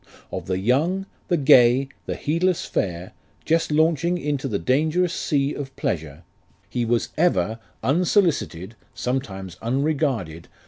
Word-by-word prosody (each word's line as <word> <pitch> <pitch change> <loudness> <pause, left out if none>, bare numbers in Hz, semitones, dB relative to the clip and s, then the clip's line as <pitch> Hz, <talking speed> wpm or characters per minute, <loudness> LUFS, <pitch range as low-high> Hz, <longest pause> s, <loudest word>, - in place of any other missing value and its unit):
Of - - -5
the 95 0 0
young, 150 - +1 0.2
the 175 - +2
gay, 135 -2 +5 0.2
the - - -2
heedless 170 +3 0
fair, 90 -1 -2 0.3
Just 165 -1 +1
launching 165 +3 +2
into 145 -4 -2
the 105 -6 -1
dangerous 155 - +1
sea 140 -2 0
of 135 -2 -7
pleasure, 80 -1 -3 0.4
He 120 +4 -2
was 115 0 0
ever, 115 - +2 0.2
unsolicited 155 - +1 0.2
(sometimes 100 - -4
unregarded) 115 - -4 0.4
LIFE 110 -10 -3
OF - - -12
RICHARD 80 +1 -10
NASH. - - -29
135 Hz, 145 wpm, -23 LUFS, 100-165 Hz, 0.4 s, gay